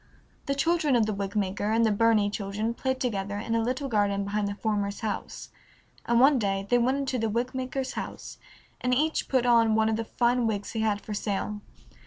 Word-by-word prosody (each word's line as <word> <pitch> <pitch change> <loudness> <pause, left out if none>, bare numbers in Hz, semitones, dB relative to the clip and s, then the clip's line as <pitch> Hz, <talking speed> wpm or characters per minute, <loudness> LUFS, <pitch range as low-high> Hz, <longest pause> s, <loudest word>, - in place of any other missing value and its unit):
The 275 - 0
children 315 -1 +2
of 230 -3 +3
the 215 - -1
wig 200 +1 -4
maker 205 0 -1
and 230 +1 +3
the 220 - +3
Burney 210 -1 +3
children 210 +3 -2
played 260 +2 -2
together 205 -6 -2
in 225 +2 -3
a 230 - +2
little 255 +4 -2
garden 205 -4 +1
behind 205 +1 -1
the 200 - -4
former's 205 -1 -2
house, 215 -2 -4 0.6
and 235 0 +3
one 270 +1 +6
day 195 -2 -1
they 245 - +5
went 255 +3 +2
into 270 -2 -2
the 225 0 0
wig 235 +4 -1
maker's 260 0 -3
house, - - -7 0.4
and 250 0 +1
each 310 +4 0
put 260 -2 +2
on 230 -2 +4
one 220 0 +3
of 220 - 0
the 225 - -2
fine 240 +1 +1
wigs 205 -2 -3
he 225 - -3
had 210 -2 0
for 215 - -6
sale. 205 0 -3
225 Hz, 215 wpm, -27 LUFS, 205-250 Hz, 0.6 s, one